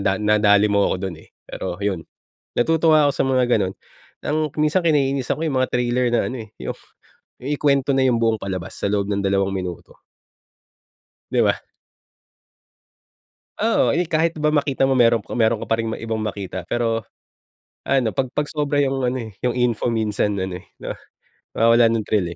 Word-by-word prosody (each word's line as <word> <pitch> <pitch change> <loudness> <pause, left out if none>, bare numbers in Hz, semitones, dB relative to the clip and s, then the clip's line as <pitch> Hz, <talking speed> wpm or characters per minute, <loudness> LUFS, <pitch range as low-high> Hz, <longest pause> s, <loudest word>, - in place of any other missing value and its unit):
nadali 105 0 +3
mo 100 -1 +3
ako - - 0
dun, 90 - -7
eh. - - -18 0.2
Pero, - - -5
yun 95 -5 -1 0.5
natutuwa 160 +3 +4
ako - - +3
sa - - 0
mga 130 -1 +2
ganun. 95 - -1 0.5
Ang 150 - -1 0.2
minsan 150 +4 +2
kinainisan 140 -5 +1
ko 160 - -3
yung 145 -4 0
mga 130 - 0
trailer 125 0 +1
na 120 - +3
ano, 125 -3 -5
eh, - - -27
yung - - -4 0.7
ikuwento 140 0 +1
na 135 0 +3
yung 125 - +3
buong 115 -1 +2
palabas 95 -3 -5
sa - - 0
loob 100 -1 0
ng 100 - 0
dalawang 95 0 +1
minuto. 90 -2 -6 1.3
Di - - +3
ba? - - +2 2.0
Oo. 225 -9 +2
Eh, 175 - +2
kahit 165 0 0
ba 150 -1 +1
makita 140 -3 +1
mo, 135 0 +3
meron 115 -2 +4
ka - - -14
meron 110 -1 +1
ka - - -9
pa 115 - +4
ring 115 - -1
ibang 115 -1 -4
makita. 100 -4 -5
Pero, 115 -1 -1 0.8
ano 130 -5 +1
pag 130 -2 -1
pag 150 0 -1
sobra 145 -1 -1
yung 135 -1 0
ano, 125 +1 0
eh, 110 - -11
yung 125 -1 0
info 120 -1 +1
minsan 105 -2 0
ano, 95 -1 -3
eh, - - -21
'no - - -5 0.6
mawawalan 115 0 +5
ng - - -10
thrill, 100 -5 +1
120 Hz, 175 wpm, -21 LUFS, 105-140 Hz, 2.0 s, mawawalan